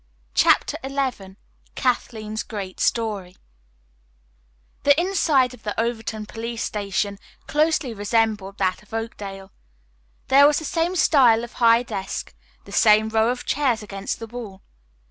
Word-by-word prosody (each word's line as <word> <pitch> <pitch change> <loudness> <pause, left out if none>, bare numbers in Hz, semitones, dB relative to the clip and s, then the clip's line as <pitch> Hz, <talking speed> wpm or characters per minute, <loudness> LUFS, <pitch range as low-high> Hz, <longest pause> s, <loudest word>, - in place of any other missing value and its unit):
CHAPTER - - +3
XI 265 -8 -3 0.4
KATHLEEN'S 220 -4 -1
GREAT 195 -4 -7
STORY 205 -6 -1 1.5
The 285 +2 +4
inside 320 -9 +2
of 250 - -14
the 210 0 -4
Overton 225 -2 -2
police 230 +1 -5
station 200 -1 -2 0.3
closely 305 -4 +1
resembled 210 -2 0
that 185 -1 0
of 210 +1 -10
Oakdale. 200 -4 -6 0.8
There 280 +2 +7
was 295 - +3
the 315 - -4
same 335 +4 0
style 250 -9 +4
of 240 - -8
high 230 0 +4
desk, 195 -5 -5 0.3
the - - -13
same 215 0 +4
row 220 +1 +2
of 245 0 -3
chairs 255 -7 0
against 195 -1 -5
the 225 - -7
wall. 220 -4 -9
225 Hz, 130 wpm, -23 LUFS, 205-255 Hz, 1.5 s, There